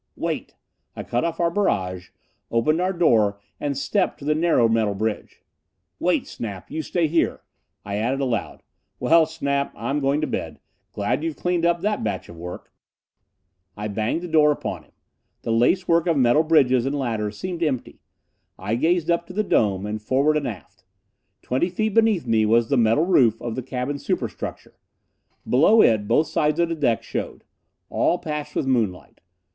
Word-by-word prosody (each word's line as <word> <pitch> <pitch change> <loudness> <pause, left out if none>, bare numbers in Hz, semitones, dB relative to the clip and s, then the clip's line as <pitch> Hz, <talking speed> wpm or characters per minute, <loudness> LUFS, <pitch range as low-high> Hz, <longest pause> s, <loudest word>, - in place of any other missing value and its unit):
"Wait!" - - -4 0.4
I - - -5
cut 120 +1 -1
off 165 -1 -2
our 170 -1 +2
barrage, 95 - -1 0.4
opened 155 +9 +1
our 185 +1 +1
door 110 - +2 0.2
and 140 -2 -2
stepped 195 +8 0
to 140 - -11
the 150 - +2
narrow 155 -7 +3
metal 110 -3 +1
bridge. 110 +1 -4 0.6
"Wait, - - +1
Snap! 100 -5 -7
You 160 - -2
stay 170 +1 0
there." 165 +2 0 0.4
I 100 0 -3
added 125 +6 -1
aloud, 125 -7 -2 0.4
"Well, 165 -1 +4
Snap, 140 -3 -2
I'm 135 +5 -2
going 140 +1 +1
to - - +1
bed. - - -4 0.3
Glad 120 +8 -1
you've 165 -2 -2
cleaned 175 -1 0
up 170 0 +1
that 210 +1 -1
batch - - -3
of 85 - -10
work." 90 +2 -9 1.0
I 105 +1 -3
banged 110 - -2
the - - -4
door 155 -2 +4
upon 145 - -4
him. - - -30 0.5
The - - -2
lacework 165 +8 +2
of 165 -3 +2
metal 125 +3 +4
bridges 135 -6 +3
and 145 +2 -1
ladders 110 -5 -2
seemed 180 -2 -5
empty. 145 -7 -2 0.6
I 100 +4 -3
gazed 165 +7 +1
up 170 0 0
to 185 - -9
the 215 +3 0
dome, 100 - +1
and 105 +1 -4
forward 135 +7 +2
and 150 -2 0
aft. 95 - -9 0.6
Twenty 130 +8 0
feet 215 +4 -1
beneath 220 -7 +3
me 110 -2 +2
was 115 +1 +3
the 140 - +2
metal 115 +7 +3
roof 120 - +3
of 120 - -4
the 130 - -3
cabin 130 +3 -4
superstructure. - - -4 0.7
Below 165 - +5
it, 110 -3 +2
both 155 - +3
sides 155 +1 0
of 170 -1 +2
the 165 - -1
deck 120 -7 0
showed. - - -5 0.5
All 175 - +2
patched 150 -3 -5
with - - 0
moonlight. 115 -9 -1
140 Hz, 175 wpm, -23 LUFS, 115-165 Hz, 1.0 s, Below